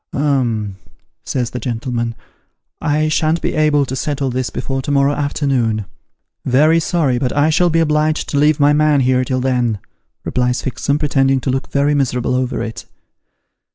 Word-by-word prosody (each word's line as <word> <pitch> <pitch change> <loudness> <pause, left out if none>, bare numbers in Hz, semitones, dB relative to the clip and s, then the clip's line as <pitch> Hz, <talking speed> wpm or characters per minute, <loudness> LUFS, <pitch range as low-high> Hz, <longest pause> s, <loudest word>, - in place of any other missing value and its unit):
' - - -43
Um,' 120 -9 0 0.5
says 125 -3 -2
the 125 - -4
gentleman, 120 -1 -3 0.4
' - - -55 0.2
I 155 0 +1
shan't 155 +1 +1
be - - -2
able 150 -2 +2
to 130 - -5
settle 135 -1 -2
this 130 0 -2
before 135 -1 -3
to 130 - -6
morrow 140 0 +3
afternoon.' 135 -7 -1 0.4
' - - -54 0.2
Very 155 +6 +4
sorry; 155 -7 0
but 130 -1 -1
I 150 +2 +3
shall 175 +3 +3
be 165 0 +2
obliged 155 0 +1
to 145 - 0
leave 150 +1 +3
my 145 0 +4
man 150 -1 +3
here 130 0 +2
till 130 0 -1
then,' 125 -4 0 0.5
replies 125 0 0
Fixem, 140 +2 -1
pretending 135 -2 +2
to 130 - -1
look 130 +1 -3
very 145 +1 +1
miserable 130 -3 0
over 125 -2 -1
it. 115 -1 -7
135 Hz, 180 wpm, -17 LUFS, 125-150 Hz, 0.5 s, Very